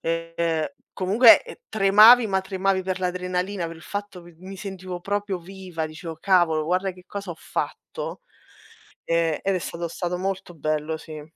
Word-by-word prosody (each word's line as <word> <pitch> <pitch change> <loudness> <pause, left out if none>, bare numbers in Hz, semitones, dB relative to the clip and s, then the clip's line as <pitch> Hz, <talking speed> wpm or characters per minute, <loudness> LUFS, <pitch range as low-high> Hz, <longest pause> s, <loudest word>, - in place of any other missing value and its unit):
ehm, 165 -1 -1 0.3
comunque 215 +6 +6 0.3
tremavi, 215 +4 +7
ma 190 -1 +1
tremavi 190 0 0
per 185 0 -2
l'adrenalina, 180 0 -2
per 165 0 -8
il 160 - -15
fatto 205 -3 -6
mi 170 -1 -15
mi 190 +2 -9
sentivo 185 -2 -6
proprio 200 0 -2
viva. 180 -2 -6
Dicevo: 160 +1 -8
"Cavolo, 170 -5 +3
guarda 185 +3 0
che 180 0 -17
cosa 200 -2 -7
ho 165 - -6
fatto." - - -5 0.9
E 165 -2 +1
ed 195 0 +1
è - - +1
stato 170 0 -5
stato 175 +1 -3
molto 190 -1 -3
bello, 155 +1 -2
sì. 155 -2 -9
180 Hz, 160 wpm, -24 LUFS, 165-195 Hz, 0.9 s, tremavi